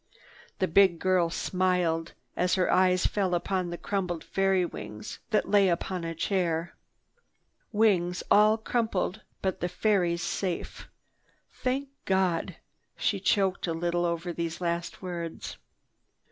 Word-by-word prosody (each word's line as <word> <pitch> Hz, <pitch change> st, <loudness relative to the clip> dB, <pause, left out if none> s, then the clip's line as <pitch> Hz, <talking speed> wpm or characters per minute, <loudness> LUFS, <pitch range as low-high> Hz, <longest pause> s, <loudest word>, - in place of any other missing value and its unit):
The 185 Hz, -, +1 dB
big 185 Hz, 0 st, +5 dB
girl 185 Hz, -1 st, +2 dB
smiled 180 Hz, -2 st, 0 dB, 0.2 s
as 180 Hz, 0 st, +2 dB
her 185 Hz, -1 st, +2 dB
eyes 185 Hz, -1 st, +4 dB
fell 190 Hz, -3 st, +1 dB
upon 180 Hz, 0 st, -1 dB
the 175 Hz, -, -5 dB
crumpled 180 Hz, -5 st, -2 dB
fairy's 195 Hz, -2 st, +1 dB
wings 105 Hz, 0 st, -8 dB
that 215 Hz, -2 st, +1 dB
lay 200 Hz, -2 st, +4 dB
upon 175 Hz, +1 st, -2 dB
a 165 Hz, 0 st, -4 dB
chair. 170 Hz, -2 st, -1 dB, 1.0 s
"Wings 190 Hz, -5 st, +2 dB
all 215 Hz, +1 st, +6 dB
crumpled 220 Hz, -3 st, -1 dB, 0.2 s
but 190 Hz, -2 st, -1 dB
the 175 Hz, -, -1 dB
fairy's 180 Hz, -3 st, +1 dB
safe, 175 Hz, 0 st, -3 dB, 0.7 s
tha—thank 265 Hz, +2 st, -1 dB, 0.2 s
God!" 190 Hz, -3 st, +1 dB, 0.4 s
She -, -, 0 dB
choked 195 Hz, -3 st, +1 dB
a 165 Hz, -, 0 dB
little 175 Hz, +1 st, 0 dB
over 170 Hz, +1 st, -2 dB
these 165 Hz, -1 st, -3 dB
last 170 Hz, +1 st, -3 dB
words. 170 Hz, -2 st, -5 dB
180 Hz, 130 wpm, -28 LUFS, 170-195 Hz, 1.0 s, all